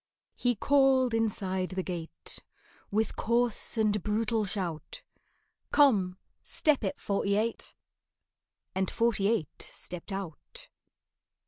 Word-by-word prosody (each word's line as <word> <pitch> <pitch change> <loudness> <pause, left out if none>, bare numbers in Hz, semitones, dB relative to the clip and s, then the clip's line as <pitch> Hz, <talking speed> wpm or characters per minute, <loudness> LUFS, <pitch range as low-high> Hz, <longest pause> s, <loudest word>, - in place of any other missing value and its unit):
He 245 -1 +1
called 265 0 +4
inside 195 -5 0
the 185 0 -3
gate 170 -3 -5 0.5
With 215 +1 0
coarse 235 0 +2
and 210 -2 +2
brutal 215 +2 +1
shout, 190 - -3 0.7
"Come, 200 -11 +4 0.2
step 300 -6 +1
it, 195 - -2
Forty 200 0 0
eight!" 225 +2 -2 1.0
And 190 0 0
Forty 230 -4 +2
eight 215 -9 -1
stepped 180 +3 -7
out. 195 - -7
210 Hz, 105 wpm, -30 LUFS, 190-235 Hz, 1.0 s, called